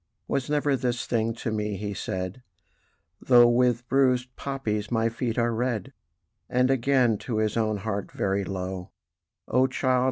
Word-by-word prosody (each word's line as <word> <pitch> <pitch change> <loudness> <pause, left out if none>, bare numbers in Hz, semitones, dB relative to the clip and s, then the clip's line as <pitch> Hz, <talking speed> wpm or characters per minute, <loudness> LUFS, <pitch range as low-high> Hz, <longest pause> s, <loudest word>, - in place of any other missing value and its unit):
"Was 140 0 -1
never 145 -1 +2
this 125 -2 -2
thing 115 -1 0
to 115 - -4
me," 105 -2 -2
he 105 +1 -4
said, 95 +4 -4 0.8
"Though 120 -2 +7
with 120 0 +2
bruisèd 125 -2 +2
poppies 110 -7 -3
my 115 -1 +1
feet 115 0 -3
are 120 -1 +2
red!" 115 -3 -2 0.6
And 125 +1 +2
again 125 -4 +2
to 115 -4 -3
his 110 -1 0
own 110 -2 +1
heart 100 0 -4
very 100 0 -1
low: 95 -1 -5 0.6
"O 130 +1 +3
child! 130 -1 +1
120 Hz, 155 wpm, -26 LUFS, 105-125 Hz, 0.8 s, Though